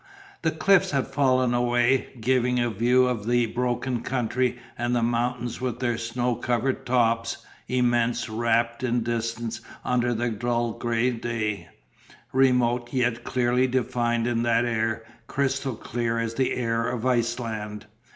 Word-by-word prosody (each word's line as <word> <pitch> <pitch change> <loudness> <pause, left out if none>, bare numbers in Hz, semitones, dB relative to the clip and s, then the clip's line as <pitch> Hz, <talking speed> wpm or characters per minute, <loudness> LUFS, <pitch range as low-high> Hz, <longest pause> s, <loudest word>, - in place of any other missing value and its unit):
The 160 - +2
cliffs 180 +4 +3
had 135 -3 0
fallen 130 -2 +2
away, 120 +1 +2
giving 125 +1 +2
a 120 -1 +1
view 125 +4 +3
of 115 -4 -2
the 120 0 +3
broken 125 +1 -1
country 125 0 0 0.2
and 120 +1 -1
the 120 - +1
mountains 120 +1 -1
with 125 -2 -2
their 120 -2 0
snow 120 +2 -1
covered 125 +3 -1
tops, 115 -2 +1 0.2
immense, 120 -1 +1
wrapped 115 +1 0
in 120 -2 0
distance 115 0 -3 0.2
under 120 -1 +1
the 120 +1 -1
dull 120 +2 -1
grey 120 +2 0
day, 115 -3 -3 0.6
remote, 125 -2 +2
yet 120 -2 0
clearly 125 +1 +1
defined 120 -2 0
in 120 -1 0
that 115 0 +2
air, 115 -1 -1 0.2
crystal 135 -2 -1
clear 115 +1 -2
as 115 -1 -1
the 130 +2 0
air 115 -1 0
of 125 -1 -3
Iceland. 115 -4 -1
120 Hz, 140 wpm, -25 LUFS, 115-125 Hz, 0.6 s, cliffs